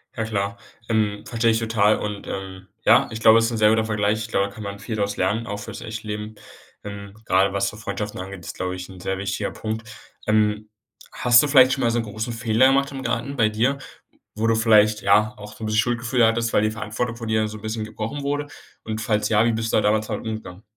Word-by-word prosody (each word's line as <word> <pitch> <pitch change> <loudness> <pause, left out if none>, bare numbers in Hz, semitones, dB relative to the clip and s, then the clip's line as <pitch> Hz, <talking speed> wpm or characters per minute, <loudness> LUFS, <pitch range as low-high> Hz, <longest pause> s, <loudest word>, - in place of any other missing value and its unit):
Ja, 110 - -2
klar. 105 0 -2 0.3
Ähm, 105 -2 0
verstehe 115 -1 +1
ich 110 - +1
total 110 -2 +2
und, 105 -1 -5
ähm, 95 -1 -7 0.2
ja, - - +6
ich 110 - -5
glaube, 110 0 +7
es 115 - +2
ist 115 - -1
'n 115 - -2
sehr 105 -1 +5
guter 110 0 +2
Vergleich. 105 0 0
Ich 110 - -4
glaube, 100 -2 +1
da - - -11
kann 110 - -9
man 100 0 -6
viel 110 +2 -5
draus 100 -1 -2
lernen, 105 +5 0
auch 100 - -4
fürs 100 - -8
echte 110 -1 -7
Leben. 105 +1 -5 0.5
Ähm, 100 -1 -8
gerade, 95 0 +3
was 100 0 +1
so 105 - -11
Freundschaften 105 -1 -5
angeht, 95 0 -7
ist, - - -7
glaube 90 0 -3
ich, 90 +1 -8
'n 95 -1 -11
sehr 95 +1 -3
wichtiger 100 0 -3
Punkt. 110 0 -5 0.4
Ähm, 105 0 +1 0.4
hast 120 +1 +5
du 150 - +1
vielleicht 130 -2 +6
schon 135 - -2
mal 115 - +3
so 120 - +1
'n - - -1
großen 110 +2 -5
Fehler 115 +2 +3
gemacht 140 +1 +2
im 135 -1 -6
Garten 120 +4 -2
bei 110 -4 +3
dir, 120 +6 +1 0.6
wo 110 +1 -1
du 115 - +3
vielleicht, 110 -1 +4
ja, 105 +4 +3
auch 105 0 -10
so 110 - -10
'n - - -2
bisschen 110 0 +1
Schuldgefühl 120 +1 +2
hattest, 115 0 +1
weil - - +4
die 110 - +1
Verantwortung 115 +1 -3
von 115 -1 -7
dir 110 -1 +1
so 110 - -7
'n 105 - -14
bisschen 110 0 -3
gebrochen 110 +6 -5
wurde? 145 +1 -2 0.4
Und 110 0 -4
falls 105 -1 0
ja, 110 +1 +4
wie 115 - +2
bist 115 0 -2
du - - +5
da - - +3
damals 105 +1 +1
damit 110 0 -4
umgegangen? 110 -3 -7
110 Hz, 250 wpm, -23 LUFS, 105-115 Hz, 0.6 s, glaube